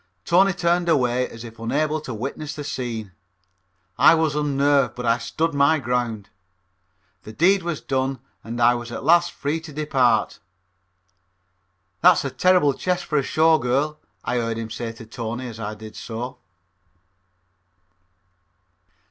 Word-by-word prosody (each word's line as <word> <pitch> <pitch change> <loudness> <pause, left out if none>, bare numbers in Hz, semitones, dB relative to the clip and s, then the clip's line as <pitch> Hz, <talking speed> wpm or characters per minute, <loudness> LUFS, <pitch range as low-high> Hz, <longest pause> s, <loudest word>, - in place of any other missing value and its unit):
Tony 190 +3 +4
turned 175 -1 0
away 125 -4 +2
as 115 0 -10
if 115 -1 -11
unable 150 +7 -1
to 130 - -7
witness 135 +6 -5
the 145 - -6
scene. 115 -7 -4 0.9
I - - +7
was 160 -2 +1
unnerved, 145 -1 +2
but 125 - -5
I 115 +1 +2
stood 160 +7 -2
my 140 +3 +4
ground. 120 -5 -2 0.9
The 110 - -10
deed 185 - +3
was 170 -3 -4
done 135 0 -1 0.3
and 115 +1 -6
I 120 +1 +5
was 120 -1 -5
at - - -6
last 175 +1 +4
free 145 +3 -2
to 160 -1 -11
depart. 135 -7 +1 1.6
"That's - - +5
a 135 - -2
terrible 180 -5 +3
chest 180 +4 -2
for 150 -3 +1
a - - +1
Show 160 +3 +3
Girl," 140 +5 -1 0.2
I 125 - -1
heard 115 -1 -1
him 115 -1 -5
to 110 - -7
say 115 -1 -4
to 115 0 -12
Tony 115 +3 -5
as 115 -2 -9
I 105 -1 -4
did 110 0 -11
so. 115 +3 -6
130 Hz, 155 wpm, -23 LUFS, 115-155 Hz, 1.6 s, I